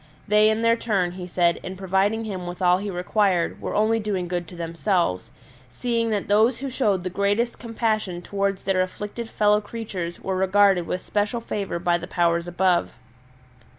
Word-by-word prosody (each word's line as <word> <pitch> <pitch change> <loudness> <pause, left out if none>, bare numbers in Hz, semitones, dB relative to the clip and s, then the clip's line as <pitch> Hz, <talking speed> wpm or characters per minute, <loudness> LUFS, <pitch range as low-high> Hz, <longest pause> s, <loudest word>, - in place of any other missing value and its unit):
They 210 +1 +5
in 220 +1 0
their 230 0 +4
turn, 200 -7 0
he 180 0 -7
said, 175 -1 +2
in 185 0 -7
providing 195 +4 0
him 185 -4 -5
with 175 0 -6
all 180 -1 +4
he 205 +1 -4
required 180 -1 0
were - - -3
only 220 +2 +2
doing 200 -4 -2
good 175 -1 -3
to 175 - -11
themselves, 170 - -1 0.4
seeing 230 - -1
that 210 -3 -1
those 220 +4 +4
who 275 0 -5
showed 205 -8 +1
the 185 - -3
greatest 205 +5 0
compassion 215 -6 -2
towards 200 0 -2
their 190 -1 +1
afflicted 210 +5 -5
fellow 210 -1 +3
creatures 205 -6 -5
were 190 - -3
regarded 190 -1 +3
with 180 - -3
special 210 +3 -1
favour 205 -5 -3
by 175 0 +1
the 175 - -7
Powers 170 -1 +1
above. 175 0 +1
195 Hz, 180 wpm, -24 LUFS, 180-215 Hz, 0.4 s, They